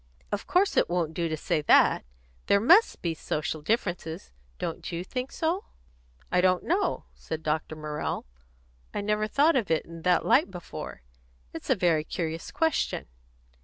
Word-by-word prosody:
"Of 205 Hz, -1 st, -3 dB
course 385 Hz, +3 st, +2 dB
it -, -, +4 dB
won't 170 Hz, -3 st, 0 dB
do 170 Hz, 0 st, -1 dB
to 155 Hz, -, -2 dB
say 155 Hz, -, 0 dB
that. -, -, +5 dB, 0.4 s
There 200 Hz, -, +5 dB
must 355 Hz, -, +5 dB
be 170 Hz, -2 st, 0 dB
social 155 Hz, 0 st, -3 dB
differences. 170 Hz, -, -2 dB, 0.3 s
Don't 165 Hz, -, -4 dB
you 170 Hz, +1 st, -3 dB
think 255 Hz, +7 st, -4 dB
so?" 335 Hz, +4 st, -1 dB, 0.7 s
"I 180 Hz, -, +4 dB
don't 185 Hz, -1 st, +3 dB
know," 370 Hz, +5 st, 0 dB
said 160 Hz, 0 st, -6 dB
Dr. 155 Hz, 0 st, -1 dB
Morrell. 150 Hz, -1 st, -4 dB, 0.7 s
"I -, -, 0 dB
never 210 Hz, +1 st, 0 dB
thought 290 Hz, +8 st, +3 dB
of 230 Hz, -8 st, +1 dB
it 160 Hz, -1 st, +1 dB
in 165 Hz, 0 st, -10 dB
that 180 Hz, +1 st, +2 dB
light 270 Hz, -4 st, +4 dB
before. 175 Hz, -, -8 dB, 0.5 s
It's -, -, -8 dB
a -, -, +5 dB
very 170 Hz, -5 st, +2 dB
curious 165 Hz, 0 st, -4 dB
question." 320 Hz, 0 st, 0 dB
180 Hz, 165 wpm, -28 LUFS, 160-230 Hz, 0.7 s, that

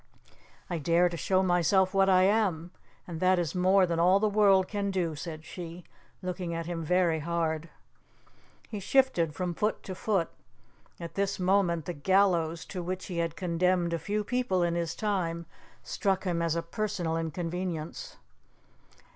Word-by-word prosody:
"I 175 Hz, -2 st, -3 dB
dare 170 Hz, +3 st, +3 dB
to 170 Hz, -, -5 dB
show 185 Hz, +3 st, +1 dB
myself 185 Hz, +1 st, +3 dB
what 195 Hz, 0 st, +4 dB
I 185 Hz, -1 st, +5 dB
am, 190 Hz, -5 st, +1 dB, 0.3 s
and 170 Hz, -3 st, -6 dB
that 185 Hz, +1 st, +3 dB
is 170 Hz, -4 st, -1 dB
more 185 Hz, +1 st, +4 dB
than 170 Hz, -1 st, -1 dB
all 180 Hz, +3 st, +5 dB
the 215 Hz, -, +2 dB
world 200 Hz, -3 st, +4 dB
can 200 Hz, -1 st, -2 dB
do," 175 Hz, -5 st, -1 dB
said 155 Hz, 0 st, -7 dB
she, 175 Hz, +1 st, -8 dB, 0.4 s
looking 180 Hz, -2 st, -3 dB
at 165 Hz, 0 st, -3 dB
him 165 Hz, -1 st, -4 dB
very 170 Hz, -1 st, +2 dB
hard. 165 Hz, 0 st, -2 dB, 1.0 s
He 210 Hz, -, -5 dB
shifted 195 Hz, -, +2 dB
from 180 Hz, +2 st, -2 dB
foot 210 Hz, +5 st, -1 dB
to 190 Hz, -, -6 dB
foot. 185 Hz, -3 st, -1 dB, 0.7 s
At 170 Hz, -1 st, -7 dB
this 200 Hz, 0 st, -1 dB
moment 180 Hz, -4 st, +2 dB
the 175 Hz, -, -3 dB
gallows, 170 Hz, 0 st, +2 dB
to 185 Hz, -, -5 dB
which 185 Hz, +2 st, -4 dB
he 175 Hz, -3 st, -4 dB
had 165 Hz, -1 st, -1 dB
condemned 175 Hz, 0 st, +1 dB
a 170 Hz, -, -1 dB
few 205 Hz, +6 st, -2 dB
people 225 Hz, -6 st, 0 dB
in 170 Hz, -1 st, +1 dB
his 170 Hz, -1 st, -2 dB
time, 175 Hz, -5 st, -2 dB, 0.4 s
struck 195 Hz, -2 st, -1 dB
him 175 Hz, -3 st, -1 dB
as 165 Hz, -1 st, 0 dB
a 170 Hz, -, -1 dB
personal 180 Hz, -3 st, -2 dB
inconvenience. 165 Hz, 0 st, -4 dB
180 Hz, 165 wpm, -29 LUFS, 165-190 Hz, 1.0 s, I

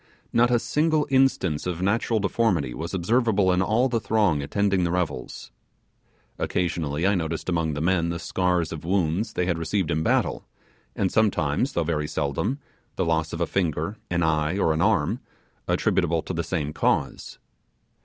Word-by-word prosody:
Not 120 Hz, +1 st, +4 dB
a 120 Hz, -, +4 dB
single 155 Hz, +5 st, +1 dB
instance 130 Hz, -, +2 dB
of 90 Hz, -2 st, -3 dB
natural 110 Hz, +4 st, +1 dB
deformity 95 Hz, -, 0 dB
was 85 Hz, +5 st, -5 dB
observable 100 Hz, 0 st, +2 dB
in 90 Hz, -, +2 dB
all 110 Hz, +7 st, +2 dB
the 120 Hz, -3 st, 0 dB
throng 100 Hz, -7 st, +1 dB
attending 95 Hz, +5 st, +1 dB
the 85 Hz, -, +1 dB
revels. 85 Hz, -10 st, -3 dB, 0.9 s
Occasionally 85 Hz, -3 st, -1 dB
I 100 Hz, -, +4 dB
noticed 80 Hz, -3 st, -2 dB
among 80 Hz, -3 st, 0 dB
the 75 Hz, -, -3 dB
men 85 Hz, 0 st, +1 dB
the 85 Hz, -, -2 dB
scars 90 Hz, -1 st, 0 dB
of 80 Hz, -2 st, -6 dB
wounds 90 Hz, +3 st, 0 dB
they 90 Hz, -, 0 dB
had 85 Hz, -2 st, -1 dB
received 90 Hz, +1 st, -1 dB
in 80 Hz, -, 0 dB
battle; -, -, +1 dB, 0.5 s
and 95 Hz, -, 0 dB
sometimes, 105 Hz, -, +1 dB
though 85 Hz, -, +1 dB
very 75 Hz, -2 st, -1 dB
seldom, 80 Hz, -, -1 dB, 0.4 s
the 95 Hz, -, 0 dB
loss 80 Hz, -1 st, 0 dB
of 85 Hz, -, -4 dB
a -, -, +3 dB
finger, 85 Hz, +1 st, -1 dB
an 85 Hz, 0 st, 0 dB
eye, 80 Hz, +2 st, +1 dB
or 80 Hz, -5 st, +2 dB
an 80 Hz, -, -1 dB
arm, -, -, +2 dB, 0.5 s
attributable 80 Hz, -1 st, +1 dB
to -, -, -5 dB
the 85 Hz, 0 st, -1 dB
same 75 Hz, -4 st, -3 dB
cause. -, -, -1 dB
90 Hz, 170 wpm, -25 LUFS, 80-100 Hz, 0.9 s, Not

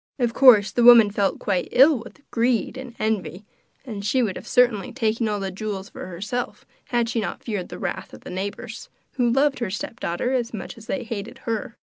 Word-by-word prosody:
Of 240 Hz, -3 st, 0 dB
course 220 Hz, -8 st, +7 dB
the 240 Hz, -, 0 dB
woman 235 Hz, -3 st, +8 dB
felt 200 Hz, -1 st, 0 dB
quite 185 Hz, -3 st, -1 dB
ill 270 Hz, +1 st, +6 dB
with 240 Hz, +6 st, -14 dB
greed 235 Hz, +1 st, +1 dB
and 255 Hz, -2 st, -8 dB
envy, 210 Hz, -3 st, -2 dB, 0.4 s
and 210 Hz, -6 st, -6 dB
she 245 Hz, +5 st, +2 dB
would 200 Hz, -5 st, -1 dB
have -, -, -9 dB
certainly 245 Hz, -6 st, +2 dB
taken 225 Hz, -2 st, 0 dB
all 210 Hz, -1 st, -1 dB
the 195 Hz, -1 st, -3 dB
jewels 195 Hz, 0 st, -5 dB
for -, -, -8 dB
herself 205 Hz, +8 st, -4 dB, 0.2 s
had 240 Hz, -1 st, 0 dB
she 230 Hz, 0 st, -1 dB
not 195 Hz, -, -5 dB
feared 205 Hz, -6 st, -4 dB
the -, -, -7 dB
wrath -, -, -4 dB
of -, -, -12 dB
the -, -, -9 dB
neighbours, 190 Hz, +2 st, -6 dB, 0.3 s
who 245 Hz, -2 st, +3 dB
loved 275 Hz, +3 st, +2 dB
her 235 Hz, -5 st, -2 dB
stepdaughter 215 Hz, +2 st, -3 dB
as 240 Hz, -3 st, -1 dB
much 195 Hz, -, -7 dB
as 225 Hz, -1 st, -14 dB
they 275 Hz, -, -2 dB
hated 225 Hz, -2 st, -6 dB
her. 230 Hz, 0 st, -3 dB
225 Hz, 205 wpm, -23 LUFS, 200-245 Hz, 0.4 s, woman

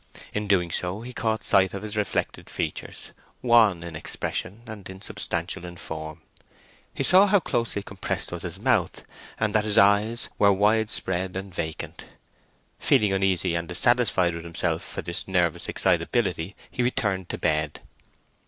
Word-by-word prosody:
In 105 Hz, 0 st, -2 dB
doing 90 Hz, -4 st, +2 dB
so 90 Hz, +5 st, -1 dB
he 125 Hz, +2 st, -8 dB
caught 110 Hz, 0 st, -1 dB
sight 95 Hz, 0 st, +3 dB
of 100 Hz, -, -5 dB
his 105 Hz, 0 st, -5 dB
reflected 105 Hz, -1 st, -2 dB
features, -, -, -4 dB, 0.3 s
wan 110 Hz, -8 st, +5 dB
in 85 Hz, -2 st, -7 dB
expression, 100 Hz, +7 st, -3 dB
and 105 Hz, -5 st, -9 dB
insubstantial 95 Hz, -2 st, -4 dB
in 85 Hz, 0 st, -8 dB
form. 80 Hz, -1 st, -6 dB, 0.7 s
He -, -, -3 dB
saw 190 Hz, +3 st, +6 dB
how 205 Hz, 0 st, +5 dB
closely 115 Hz, -, -2 dB
compressed 95 Hz, -1 st, -2 dB
was 85 Hz, -1 st, -5 dB
his 90 Hz, 0 st, -5 dB
mouth, 110 Hz, -5 st, +1 dB, 0.4 s
and 110 Hz, -1 st, +1 dB
that 105 Hz, -1 st, +4 dB
his 105 Hz, -1 st, 0 dB
eyes 105 Hz, +4 st, +4 dB
were 100 Hz, -1 st, +6 dB
wide 105 Hz, +3 st, +3 dB
spread 95 Hz, -3 st, -2 dB
and 95 Hz, -1 st, -6 dB
vacant. 80 Hz, -3 st, -5 dB, 0.7 s
Feeling 105 Hz, -8 st, +3 dB
uneasy 95 Hz, -2 st, +1 dB
and 85 Hz, 0 st, -2 dB
dissatisfied 95 Hz, -2 st, +2 dB
with 85 Hz, 0 st, -6 dB
himself 85 Hz, -1 st, -1 dB
for -, -, -6 dB
this 85 Hz, -, -4 dB
nervous 90 Hz, -4 st, 0 dB
excitability, 95 Hz, -5 st, 0 dB, 0.2 s
he -, -, -2 dB
returned 100 Hz, -7 st, 0 dB
to -, -, -3 dB
bed. 75 Hz, -1 st, 0 dB
95 Hz, 155 wpm, -26 LUFS, 85-110 Hz, 0.7 s, saw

